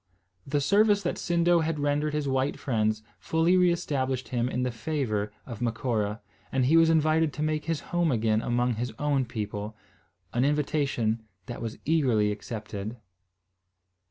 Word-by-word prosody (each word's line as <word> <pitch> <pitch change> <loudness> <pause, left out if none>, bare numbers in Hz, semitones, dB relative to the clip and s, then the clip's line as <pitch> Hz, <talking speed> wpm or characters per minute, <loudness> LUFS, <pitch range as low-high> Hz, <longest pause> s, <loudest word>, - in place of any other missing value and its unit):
The 145 +1 +1
service 205 +5 +4
that 175 - -2
Sindo 175 -1 +3
had 160 -1 -1
rendered 145 +1 0
his 150 -2 -1
white 135 +1 0
friends 110 -4 0 0.2
fully 165 +3 +2
re 180 -1 +5
established 130 -7 -2
him 120 0 0
in 125 -1 -1
the 125 - 0
favour 115 -5 -2
of 120 -2 -8
Macora, 115 -3 -1 0.3
and 130 -1 +2
he 150 +6 +4
was 165 0 +6
invited 160 0 +3
to 150 - -3
make 155 -1 -1
his 165 -2 -1
home 175 -3 +2
again 110 -2 +2
among 120 -1 0
his 120 +2 -2
own 145 -3 +1
people, 105 -1 -5 0.6
an 120 - +2
invitation 140 -6 0 0.2
that 120 - -7
was 115 -1 -4
eagerly 125 -10 +2
accepted. 105 +1 -6
130 Hz, 155 wpm, -27 LUFS, 115-155 Hz, 0.6 s, was